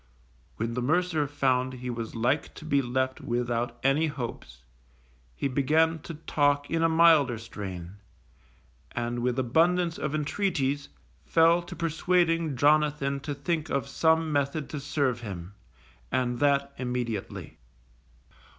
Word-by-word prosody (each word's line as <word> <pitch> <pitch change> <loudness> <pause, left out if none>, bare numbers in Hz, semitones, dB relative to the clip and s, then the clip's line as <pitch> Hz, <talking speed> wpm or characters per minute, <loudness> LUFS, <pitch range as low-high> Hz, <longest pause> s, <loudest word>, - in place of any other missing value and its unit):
_ - - -35 0.5
When 115 +1 -3
the 125 - -2
mercer 155 +2 +1
found 130 -2 +1
he 125 0 -5
was 115 -1 -5
like 120 +6 0
to 155 - -10
be 140 -2 +2
left 130 +1 -1
without 120 0 -2
any 140 +4 +3
hopes, 115 - -7 0.7
he - - -1
began 155 +5 +2
to 165 +2 -8
talk 145 -2 +1
in 165 0 +1
a 165 - +4
milder 160 -7 +5
strain, 100 -5 -7 1.0
and 120 0 -2
with 125 +1 0
abundance 165 +7 +2
of 150 0 -2
intreaties 145 -3 -1 0.4
fell 165 +1 +4
to 175 - -9
persuading 165 -1 +1
Jonathan 145 0 +2
to 145 +1 -5
think 155 +2 -2
of 140 0 -1
some 160 +2 +2
method 140 +1 -1
to 150 - -4
serve 140 -4 -1
him, 95 -4 -7 0.6
and 125 -1 0
that 140 -1 +2
immediately. 125 -5 -4
140 Hz, 135 wpm, -27 LUFS, 120-160 Hz, 1.0 s, milder